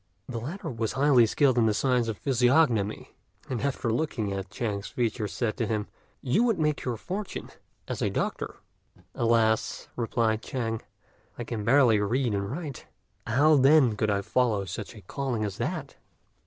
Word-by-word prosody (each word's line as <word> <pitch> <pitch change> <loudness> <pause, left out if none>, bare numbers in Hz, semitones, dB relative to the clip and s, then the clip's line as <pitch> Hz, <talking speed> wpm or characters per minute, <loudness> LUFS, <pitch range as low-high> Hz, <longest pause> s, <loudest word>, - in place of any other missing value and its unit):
The 120 -3 -4
latter 150 - -5
was 115 -2 -2
highly 135 -4 +5
skilled 130 +1 +3
in 115 - +4
the 105 - +2
science 125 -1 +1
of 110 -2 -3
physiognomy; 125 -5 +2 0.3
and, 125 -4 -3
after 130 -4 -1
looking 115 -7 -1
at 95 -1 -5
Chang's 105 -3 -3
features, 115 -3 -2
said 115 -2 -2
to 115 -4 -1
him, 105 -1 -1 0.4
"You 135 - +2
would 230 -4 +2
make 150 -2 0
your 120 -3 -2
fortune 195 - -5 0.4
as - - -4
a - - +1
doctor." - - -3 0.6
"Alas!" 115 -1 +1
replied 115 -2 0
Chang, 115 -3 -3 0.6
"I 120 - -4
can 115 -2 -4
barely 120 -2 +5
read 115 +3 0
and 100 0 -2
write; 145 -1 -6 0.4
how 145 +7 +4
then 135 -4 +5
could 110 0 0
I 100 -1 +1
follow 110 -2 +1
such 95 +5 -6
a 105 - -11
calling 125 0 -2
as 100 -1 -5
that?" - - -4
120 Hz, 170 wpm, -27 LUFS, 110-135 Hz, 0.6 s, highly